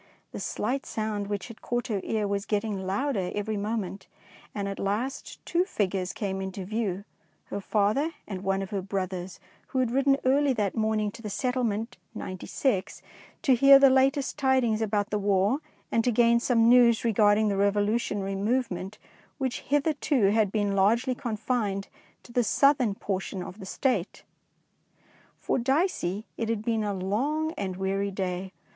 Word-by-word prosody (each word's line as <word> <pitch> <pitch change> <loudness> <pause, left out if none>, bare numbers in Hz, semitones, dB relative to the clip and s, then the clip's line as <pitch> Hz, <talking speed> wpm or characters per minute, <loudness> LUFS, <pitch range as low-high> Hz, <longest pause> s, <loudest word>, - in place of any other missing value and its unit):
The - - -6
slight 260 +5 -2
sound 215 -2 -3
which 205 -2 -3
had 230 -2 -12
caught 240 0 -2
her 210 -6 -2
ear 215 -2 -1
was 200 0 -2
getting 205 -3 -1
louder 200 -2 -1
every 210 +1 -2
moment, 205 -2 -3 0.5
and 200 -1 -2
at 195 - -5
last 215 +8 -3
two 345 +1 +2
figures 195 - -1
came 195 0 -3
into 190 0 -5
view, 200 -2 -2 0.5
her 200 - -3
father 215 +10 +1 0.2
and 190 -3 -5
one 195 0 0
of 190 - -8
her 200 -2 -1
brothers, 185 -1 -4 0.3
who - - -5
had 255 -3 +2
ridden 275 +2 +3
early 275 +1 +3
that 205 -5 -1
morning 215 -1 0
to 230 - -12
the 215 - -5
settlement 235 +1 -1 0.2
"Ninety 185 -3 -6
six" 200 -9 -1 0.4
to 270 - +5
hear 275 +3 +8
the 275 -1 +6
latest 270 +1 +2
tidings 260 -5 +2
about 210 -1 0
the 210 - 0
War, 200 +5 +2 0.3
and 230 - +2
to 245 - +2
gain 235 +1 +4
some 235 -2 +3
news 235 -1 +5
regarding 215 -1 +4
the 200 - 0
revolutionary 205 0 0
movement 200 -2 -1 0.4
which 260 -3 -2
hitherto 285 -6 +1
had 215 -2 +2
been 205 -2 0
largely 230 +7 +3
confined 220 -4 -2 0.3
to - - -14
the 245 - +3
southern 255 -3 +3
portion 190 -2 -3
of 190 +3 -9
the 190 - -8
State. 210 -6 -1 1.1
For - - -1
Dicey 250 - 0
it 225 -1 -2
had 220 -1 -2
been 225 -2 +1
a 205 - -1
long 270 +12 -1
and 195 - -4
weary 195 +1 -1
day. 185 -1 -3
215 Hz, 165 wpm, -27 LUFS, 195-250 Hz, 1.1 s, hear